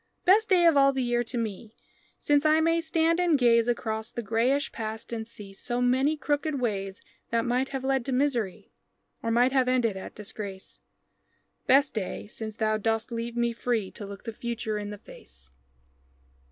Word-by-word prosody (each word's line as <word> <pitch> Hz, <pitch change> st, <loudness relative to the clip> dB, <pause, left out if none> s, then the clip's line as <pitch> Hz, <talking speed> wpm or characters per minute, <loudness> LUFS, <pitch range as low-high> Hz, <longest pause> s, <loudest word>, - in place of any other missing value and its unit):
Best 425 Hz, +4 st, +5 dB
day 360 Hz, -3 st, +5 dB
of 330 Hz, -3 st, +6 dB
all 275 Hz, 0 st, +6 dB
the 265 Hz, -1 st, -1 dB
year 240 Hz, 0 st, +1 dB
to 245 Hz, -, -4 dB
me, 220 Hz, 0 st, -4 dB, 0.4 s
Since 290 Hz, 0 st, +2 dB
I 310 Hz, 0 st, +4 dB
may 330 Hz, +1 st, +2 dB
stand 330 Hz, +1 st, +1 dB
and 345 Hz, -4 st, +3 dB
gaze 235 Hz, -2 st, +4 dB
Across 220 Hz, -2 st, -2 dB
the 235 Hz, -, -4 dB
grayish 235 Hz, +6 st, +1 dB
past 220 Hz, +1 st, -6 dB
and 220 Hz, -1 st, -4 dB
see 205 Hz, -4 st, -10 dB
So 240 Hz, +5 st, -3 dB
many 260 Hz, +5 st, +2 dB
crooked 295 Hz, 0 st, -1 dB
ways 195 Hz, -5 st, -3 dB, 0.3 s
That 230 Hz, 0 st, 0 dB
might 250 Hz, +2 st, 0 dB
have 270 Hz, -1 st, -4 dB
led 265 Hz, -1 st, +1 dB
to 270 Hz, -, -2 dB
misery, 250 Hz, -7 st, -1 dB, 0.5 s
Or 230 Hz, -, -2 dB
might 245 Hz, +3 st, +3 dB
have 260 Hz, -2 st, +2 dB
ended 245 Hz, -5 st, +2 dB
at 190 Hz, -, -8 dB
Disgrace 200 Hz, -2 st, -8 dB, 0.9 s
Best 275 Hz, +2 st, +4 dB
day 205 Hz, -5 st, -4 dB
since 215 Hz, +1 st, -7 dB
thou 215 Hz, -1 st, +1 dB
dost 225 Hz, +2 st, -1 dB
leave 235 Hz, +1 st, -4 dB
me 235 Hz, 0 st, +1 dB
free 230 Hz, -4 st, -1 dB
To -, -, -9 dB
look 200 Hz, -1 st, -9 dB
the 225 Hz, -, -5 dB
future 225 Hz, -2 st, -3 dB
in 205 Hz, 0 st, -5 dB
the 210 Hz, -, -7 dB
face. 65 Hz, -, -14 dB
235 Hz, 185 wpm, -27 LUFS, 220-275 Hz, 0.9 s, of